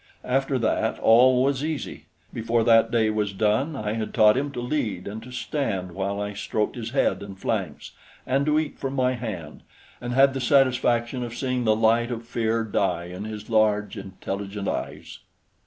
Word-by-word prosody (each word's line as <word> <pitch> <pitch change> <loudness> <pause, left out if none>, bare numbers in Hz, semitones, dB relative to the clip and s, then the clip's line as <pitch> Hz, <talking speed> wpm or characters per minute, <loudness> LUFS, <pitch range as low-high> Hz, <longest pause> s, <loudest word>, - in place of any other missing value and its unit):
After 135 +1 +1
that, 110 -1 0
all 125 +3 +5
was 140 0 0
easy. 155 -2 -4 0.3
Before 115 0 0
that 115 0 +5
day 110 -2 +2
was 105 -2 -1
done, 110 +10 +1
I 105 -4 -3
had 110 -1 -4
taught 105 0 +6
him 140 +2 -1
to - - -4
lead 120 -8 -2
and 105 +2 -6
to 125 +3 -11
stand 115 -7 -3
while 100 +2 -3
I 105 0 -3
stroked 105 +1 -2
his 115 -2 -5
head 135 -4 +1
and 100 -1 -9
flanks, - - -3 0.3
and 135 +2 +1
to 150 0 +3
eat 155 -2 -2
from 135 0 -3
my 130 -1 +2
hand, 105 -11 -6 0.4
and 120 - -4
had 135 +1 +5
the 135 - -3
satisfaction 125 -2 +2
of 120 -1 -5
seeing 125 -1 -1
the 110 -1 +4
light 115 +2 +2
of 120 -1 -5
fear 115 -1 0
die 100 -5 -1
in 95 +3 -6
his 110 -1 -7
large, 105 -2 +2
intelligent 100 0 -5
eyes. - - -5
115 Hz, 185 wpm, -25 LUFS, 105-130 Hz, 0.4 s, taught